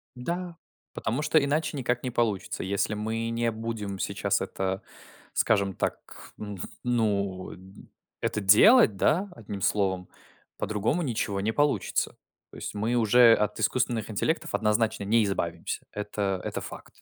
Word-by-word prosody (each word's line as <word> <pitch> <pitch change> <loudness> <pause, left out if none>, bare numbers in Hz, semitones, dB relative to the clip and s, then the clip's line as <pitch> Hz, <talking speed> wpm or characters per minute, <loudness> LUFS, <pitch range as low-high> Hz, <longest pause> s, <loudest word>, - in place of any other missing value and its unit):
Да. 170 +6 -4 0.4
Потому 120 +7 -2
что 150 0 +3
иначе 150 +1 0
никак 125 -2 -1
не 125 - -2
получится. 115 -5 -1
Если 100 +2 0
мы 110 +2 -2
не 115 0 0
будем 110 -3 -4
сейчас - - 0
это, 95 0 -2 0.5
скажем 100 -3 +2
так, - - -5
ну 105 -2 -6 0.3
ну, 100 -6 0
э, - - -12 0.6
это 105 - -1
делать, 105 - +7
да, 180 - +2
одним 100 -3 -7
словом, 95 -2 0 0.5
по-другому 110 - 0
ничего 115 - -1
не 110 +3 0
получится. 145 +2 0 0.3
То - - -12
есть - - -5
мы 110 +4 0
уже 120 +1 +6
от 105 -1 0
искусственных 115 -1 0
интеллектов 160 +10 -1
однозначно 110 -1 +1
не 110 +3 +3
избавимся. 85 -4 -3
Это 100 -2 -2
это - - -3
факт. - - -10
110 Hz, 140 wpm, -27 LUFS, 100-125 Hz, 0.6 s, делать